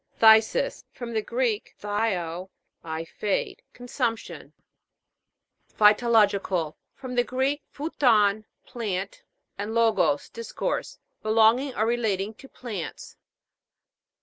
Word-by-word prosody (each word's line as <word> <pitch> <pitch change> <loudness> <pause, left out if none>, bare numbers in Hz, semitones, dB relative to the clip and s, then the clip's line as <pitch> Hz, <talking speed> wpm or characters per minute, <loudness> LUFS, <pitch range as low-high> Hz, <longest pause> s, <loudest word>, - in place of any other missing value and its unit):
PHTHI'SIS. 220 - +5
From 240 -2 -7
the 220 - +1
Greek, 235 -1 -2
phthio, 190 -4 -2 0.3
I 160 0 -4
fade. 200 +4 -2
Consumption. 245 -2 -4 1.3
PHYTOLO'GICAL. 210 -6 +3 0.2
From 255 -2 -7
the 245 0 +3
Greek, 265 +4 -1
phuton, 220 -9 +2 0.2
plant, 200 -5 -4 0.4
and 210 +3 -3
logos, 195 -11 +2
discourse. 230 0 -4 0.2
Belonging 225 +5 +3
or 215 - +1
relating 220 -3 0
to 270 +5 -15
plants. 215 -9 -7
220 Hz, 95 wpm, -26 LUFS, 200-240 Hz, 1.3 s, PHTHI'SIS